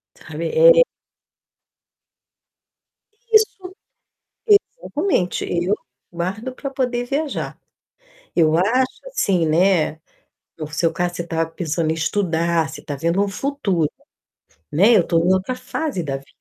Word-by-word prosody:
Sabe, - - -6
é - - +7 2.5
Isso, 385 -4 +2 1.0
exatamente, 295 - -1
eu 180 +4 0 0.4
guardo 195 +9 -4
pra 275 +1 -5
poder 250 -2 -1
viajar. 285 +3 -3 0.8
Eu 160 -1 +3
acho 255 - 0
assim, 190 - +1
né, 165 -1 +3 0.6
no 155 -2 -5
seu 165 +2 +1
caso, 175 -1 -2
você 170 - -4
tá 165 0 0
pensando 160 -1 -2
em - - +1
estudar, 165 -2 0
você - - -9
tá 145 - -5
vendo 170 +7 +1
um - - -1
futuro, 200 - -1 0.8
né. 200 +10 +5
Eu 175 - +4
tô 165 - +3
em 180 +3 +3
outra 190 +7 -1
fase 285 - -3
da 135 -3 -3
vida, 135 - -16
180 Hz, 125 wpm, -21 LUFS, 165-255 Hz, 2.5 s, é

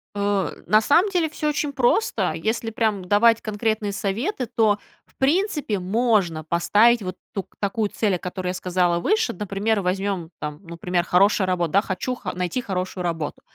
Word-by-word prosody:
Э, 200 -2 0
на 215 +3 +4
самом 335 - +4
деле, 345 -4 +1
всё 305 0 -2
очень 295 -1 -1
просто. 240 - +1
Если 220 +7 -2
прям 215 -4 0
давать 225 +4 +4
конкретные 215 0 -1
советы, 235 - -2
то, 215 -3 +2 0.3
в - - -31
принципе, 295 - +1
можно 190 -4 +1
поставить 205 +9 +3
вот 185 -1 -4 0.2
ток 195 -2 -6
такую 205 +1 -1
цель, 205 -3 0
о - - -4
которой 180 +1 -5
я 180 - -1
сказала 180 -1 0
выше. 435 - +1
Например, 205 +2 -1
возьмем, 190 -2 -2
там, 150 0 -5
ну, 170 -1 -9
пример: 175 +1 0
хорошая 190 +3 +3
рабо 180 -2 +1
Да, 190 +6 +3
хочу 210 +6 -3
ха 195 -6 -6
найти 180 +7 -2
хорошую 185 -3 -3
работу, 165 -4 -3
200 Hz, 175 wpm, -23 LUFS, 180-230 Hz, 0.3 s, на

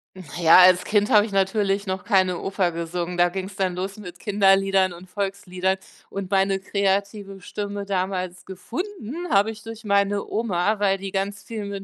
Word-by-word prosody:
Na 185 - -10 0.2
ja, 165 +1 +8
als 185 0 +7
Kind 210 0 +1
habe 210 0 +6
ich - - -10
natürlich 195 +1 +1
noch 190 0 -3
keine 185 -4 +2
Oper 195 -2 -1
gesungen, 170 +1 -4
da 175 0 +3
ging's 190 +1 -6
dann 185 -3 -1
los 190 +3 -4
mit 180 -4 -10
Kinderliedern 195 -2 +3
und 175 +2 -11
Volksliedern 190 -1 -2 0.3
und 195 -1 -6
meine 195 0 +2
kreative 200 0 -1
Stimme 205 +1 -5
damals 185 -2 -3
gefunden 295 - -6
habe 205 +2 +3
ich 215 -1 -11
durch 225 +1 -9
meine 200 0 +1
Oma, 210 -1 0
weil 195 -1 +2
die 195 0 -6
ganz 195 0 -3
viel 220 -3 -6
mit 200 -1 -6
195 Hz, 180 wpm, -23 LUFS, 185-205 Hz, 0.3 s, ja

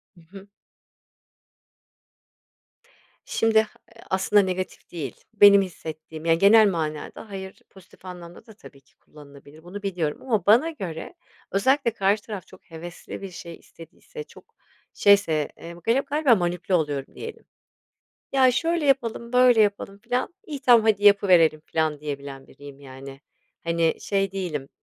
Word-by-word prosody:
Hı 170 - -19
hı. 195 0 -12 2.8
Şimdi 225 -1 +2
a 215 - -7 0.4
aslında 190 +2 +3
negatif 185 -1 -5
değil. 150 -8 -6 0.2
Benim 200 -1 +7
hissettiğim, 160 -3 -8
yani, 165 0 +3
genel 210 +3 +6
manada 160 +4 -5
"hayır" 190 -1 -8
pozitif 190 -1 -19
anlamda 175 -1 -11
da 220 - -15
tabii 140 -9 -16
ki - - -33
kullanılabilir. 145 +1 -17
Bunu 200 +3 -9
biliyorum 175 -6 -3
ama 220 -8 -1
bana 240 +11 +5
göre, 190 - -7 0.4
özellikle 260 +5 +2
karşı 205 0 +1
taraf 200 -5 -8
çok 185 -2 -19
hevesli 170 +4 -9
bir 195 - -7
şey 170 -1 -9
istediyse, 170 - -13
çok 460 +1 -19 0.4
şeyse, 200 -7 +3
eee, 170 0 -10
gali 235 +4 +3
galiba 285 -4 +2
manipüle 175 0 -2
oluyorum 145 -5 -1
diyelim. 460 - -9 0.9
"Ya 260 -2 +5
şöyle 335 +3 0
yapalım, 235 -3 0
böyle 250 -2 +5
yapalım" 200 -1 0
filan, 250 +10 -3
iyi 290 -4 -6
tamam, 235 -3 +5
hadi 205 -1 +2
yapıverelim 180 -6 +5
filan 155 -2 -1
diyebilen 140 -2 -7
biriyim, 145 -1 -14
yani. 135 0 -11 0.4
Hani, 165 -1 +1
şey 195 -1 -1
değilim, 160 -8 -4
190 Hz, 140 wpm, -24 LUFS, 160-220 Hz, 2.8 s, Benim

